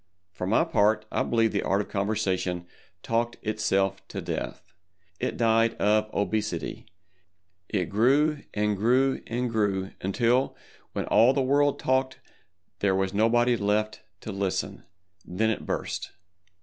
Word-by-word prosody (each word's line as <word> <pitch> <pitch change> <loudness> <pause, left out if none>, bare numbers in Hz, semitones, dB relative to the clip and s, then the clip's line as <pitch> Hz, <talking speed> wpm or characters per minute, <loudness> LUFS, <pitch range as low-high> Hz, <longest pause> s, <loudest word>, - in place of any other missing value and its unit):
For 90 - -5
my 105 - +3
part, 105 +1 +2
I - - 0
believe 115 -1 +2
the 100 - 0
Art 95 - +1
of 105 - -3
Conversation 95 -4 -1 0.4
talked 115 +1 -1
itself 105 -3 0
to - - -6
death. - - -5 0.5
It - - -2
died 115 0 +3
of 105 +1 +2
obesity—it 90 -2 -5
grew 140 - +2
and 105 0 0
grew 125 +6 +2
and 120 +2 -1
grew 100 -4 0
until, 120 +7 +1 0.4
when - - -2
all 115 +5 +5
the 135 - +1
world 140 +2 +2
talked 130 0 0 0.6
there 95 -2 +2
was 95 0 0
nobody 120 +3 +3
left 105 0 0 0.2
to 110 - -6
listen. 95 -2 -3 0.4
Then 110 +5 0
it 110 - -5
burst. - - -3
110 Hz, 135 wpm, -27 LUFS, 95-115 Hz, 0.6 s, all